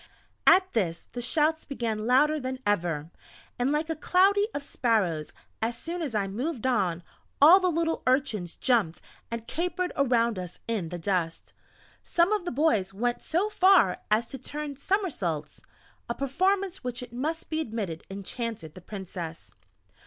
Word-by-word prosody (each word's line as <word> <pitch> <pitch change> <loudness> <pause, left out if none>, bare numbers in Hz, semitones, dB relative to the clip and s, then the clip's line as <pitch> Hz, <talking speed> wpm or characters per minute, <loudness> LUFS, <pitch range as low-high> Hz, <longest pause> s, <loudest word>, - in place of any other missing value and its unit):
At 375 0 +6
this 175 -7 -1
the 245 - -5
shouts 310 +5 +2
began 225 -5 -3
louder 300 +5 +4
than 260 -1 -4
ever, 170 -6 0 0.5
and 250 +3 +2
like 300 +2 0
a 325 - -2
cloudy 395 +6 +3
of 285 - -4
sparrows, 200 - 0 0.3
as 230 +1 -1
soon 345 +1 -5
as 275 -8 -3
I 200 -2 +1
moved 250 +6 -3
on, 190 -9 +1 0.4
all 325 +7 +9
the 370 -1 +2
little 325 -1 0
urchins 235 - +1
jumped 225 -10 +1 0.3
and 230 -1 -5
capered 360 +5 -2
around 235 -6 +2
us 180 -1 -7
in 210 -8 -2
the 175 - -5
dust; 170 -2 -2 0.5
some 345 +4 +2
of 410 -4 -1
the - - -2
boys 225 -10 +1
went 240 +3 -1
so 355 +6 0
far 365 - +5
as 215 +3 +3
to 270 - -7
turn 295 +2 -5
summersaults, 285 - -2 0.5
a 235 - -1
performance 375 +7 0
which 250 0 -3
it 240 -1 -11
must 310 +8 -3
be 315 0 0
admitted 210 - -4
enchanted 200 -3 -5
the 185 - -11
Princess. 180 -4 -7
245 Hz, 160 wpm, -27 LUFS, 195-320 Hz, 0.5 s, all